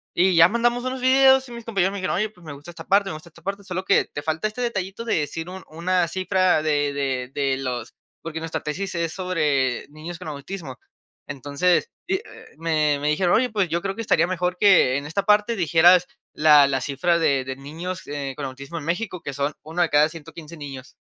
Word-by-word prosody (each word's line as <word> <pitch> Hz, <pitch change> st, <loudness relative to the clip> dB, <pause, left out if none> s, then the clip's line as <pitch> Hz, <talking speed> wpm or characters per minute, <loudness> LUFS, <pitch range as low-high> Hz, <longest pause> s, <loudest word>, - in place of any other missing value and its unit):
Y 185 Hz, +1 st, +3 dB
ya 165 Hz, 0 st, +8 dB
mandamos 240 Hz, +3 st, 0 dB
unos 255 Hz, 0 st, -3 dB
videos, 265 Hz, +1 st, +5 dB
y -, -, -11 dB
mis 235 Hz, -1 st, -9 dB
compañeros 195 Hz, -4 st, +1 dB
me 200 Hz, -, -5 dB
dijeron: 185 Hz, -, -1 dB
"Oye, 215 Hz, +4 st, 0 dB
pues, 180 Hz, -5 st, -20 dB
me 150 Hz, -, -7 dB
gusta 145 Hz, +5 st, -11 dB
esta -, -, -11 dB
parte 200 Hz, 0 st, +3 dB
me -, -, -4 dB
gusta 160 Hz, +3 st, -11 dB
esta 170 Hz, -, -19 dB
parte. 200 Hz, +1 st, -4 dB
Sólo 185 Hz, -1 st, -4 dB
que, 195 Hz, -, +3 dB
te 145 Hz, -, -7 dB
falta 160 Hz, +6 st, -1 dB
este 215 Hz, +4 st, -7 dB
detallito 205 Hz, -2 st, -3 dB
de 230 Hz, -, 0 dB
decir 160 Hz, +3 st, -4 dB
un 190 Hz, +1 st, -8 dB
una 175 Hz, +2 st, 0 dB
cifra 185 Hz, -2 st, +1 dB
de 145 Hz, -2 st, +1 dB
de 135 Hz, -2 st, -2 dB
de 135 Hz, -2 st, 0 dB
los", 125 Hz, -3 st, -4 dB, 0.3 s
porque 160 Hz, 0 st, -5 dB
nuestra 165 Hz, 0 st, -4 dB
tesis 185 Hz, +5 st, -4 dB
es 170 Hz, -1 st, -1 dB
sobre 150 Hz, -9 st, 0 dB
niños 155 Hz, +3 st, -8 dB
con 160 Hz, -, -8 dB
autismo. 145 Hz, -1 st, -7 dB, 0.5 s
Entonces, 145 Hz, -, 0 dB, 0.2 s
y, 380 Hz, -, +1 dB
eh, 395 Hz, -, -3 dB, 0.4 s
me 155 Hz, -3 st, +1 dB
me 145 Hz, -, -2 dB
dijeron: 175 Hz, +3 st, +2 dB
"Oye, 250 Hz, +1 st, +2 dB
pues 200 Hz, -5 st, 0 dB
yo 170 Hz, +2 st, -1 dB
creo 195 Hz, -, -2 dB
que 230 Hz, -, -5 dB
estaría 170 Hz, -6 st, +3 dB
mejor, 180 Hz, 0 st, -1 dB
que 185 Hz, -10 st, +5 dB
en 140 Hz, -, -5 dB
esta 160 Hz, +7 st, -1 dB
parte 210 Hz, +2 st, +3 dB
dijeras 175 Hz, 0 st, +5 dB, 0.3 s
la 150 Hz, -2 st, +6 dB
la 135 Hz, -1 st, -1 dB
cifra 170 Hz, +7 st, +1 dB
de 140 Hz, -5 st, +1 dB
de 130 Hz, -, -4 dB
niños, 165 Hz, +7 st, -7 dB
eh, 140 Hz, -2 st, -4 dB
con 145 Hz, -, -5 dB
autismo 140 Hz, +5 st, -7 dB
en 145 Hz, -, -9 dB
México, 180 Hz, +1 st, -3 dB
que 140 Hz, -, -6 dB
son 140 Hz, +2 st, -1 dB
1 160 Hz, +3 st, -3 dB
de 165 Hz, -, 0 dB
cada 150 Hz, +1 st, +4 dB
115 165 Hz, 0 st, -11 dB
niños". 135 Hz, -3 st, -9 dB
170 Hz, 225 wpm, -23 LUFS, 145-190 Hz, 0.5 s, ya